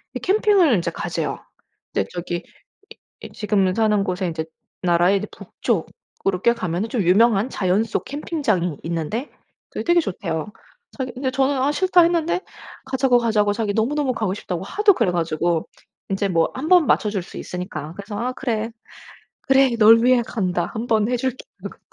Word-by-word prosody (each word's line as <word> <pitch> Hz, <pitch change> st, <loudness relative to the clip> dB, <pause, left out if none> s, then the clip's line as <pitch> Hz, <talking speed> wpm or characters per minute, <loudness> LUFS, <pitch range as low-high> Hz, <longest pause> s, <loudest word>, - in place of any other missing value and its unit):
이 -, -, -2 dB
캠핑을 390 Hz, -, +3 dB
인제 175 Hz, -5 st, 0 dB
가제요. -, -, -3 dB, 0.5 s
네 95 Hz, -, +1 dB
저기 175 Hz, 0 st, -3 dB
이 -, -, -10 dB, 0.8 s
이 -, -, -8 dB
지금은 195 Hz, -3 st, +1 dB
사는 215 Hz, -2 st, +2 dB
곳에 185 Hz, 0 st, -2 dB
인제 160 Hz, -1 st, -4 dB, 0.4 s
나라의 180 Hz, +2 st, +3 dB
북쪽으로 195 Hz, -2 st, -4 dB
꽤 235 Hz, 0 st, +4 dB
가면은 185 Hz, +2 st, -2 dB
좀 225 Hz, -2 st, -1 dB
유명한 210 Hz, +5 st, +3 dB
자연 190 Hz, +1 st, +1 dB
속 225 Hz, -, -3 dB
캠핑장이 255 Hz, -, -1 dB
있는데 170 Hz, -, -3 dB, 0.4 s
그게 -, -, -5 dB
되게 345 Hz, 0 st, +4 dB
좋대요. 165 Hz, -, -3 dB, 0.5 s
자기 255 Hz, -2 st, -3 dB
근데 260 Hz, +1 st, -2 dB
저는 270 Hz, +1 st, +1 dB
"아 280 Hz, -, +2 dB
싫다." 365 Hz, +3 st, +3 dB
했는데 340 Hz, +1 st, +1 dB, 0.5 s
"가자고 260 Hz, -2 st, +2 dB
가자고 215 Hz, -3 st, +2 dB
자기 205 Hz, -1 st, -2 dB
너무너무 265 Hz, +4 st, 0 dB
가고 215 Hz, -4 st, -1 dB
싶다."고 180 Hz, -3 st, -5 dB
하도 410 Hz, -, +3 dB
그래 225 Hz, -, +1 dB
가지고 165 Hz, 0 st, -1 dB, 0.4 s
인제 195 Hz, +1 st, -1 dB
뭐 165 Hz, -3 st, +2 dB
1 280 Hz, +5 st, -4 dB
번 355 Hz, -5 st, +6 dB
맞춰줄 205 Hz, -3 st, +1 dB
수 -, -, -13 dB
있으니까. 175 Hz, -4 st, -6 dB
그래서 205 Hz, +1 st, -7 dB
'아 250 Hz, +2 st, -2 dB
그래, 230 Hz, -4 st, -2 dB, 0.7 s
그래 270 Hz, 0 st, +4 dB
널 230 Hz, +2 st, +7 dB
위해 255 Hz, -1 st, +5 dB
간다.' 180 Hz, -5 st, -1 dB
1 225 Hz, +2 st, -3 dB
번 220 Hz, 0 st, +2 dB
해줄게 255 Hz, +1 st, -2 dB, 0.2 s
하고. -, -, -8 dB
220 Hz, 335 characters per minute, -22 LUFS, 180-260 Hz, 0.8 s, 널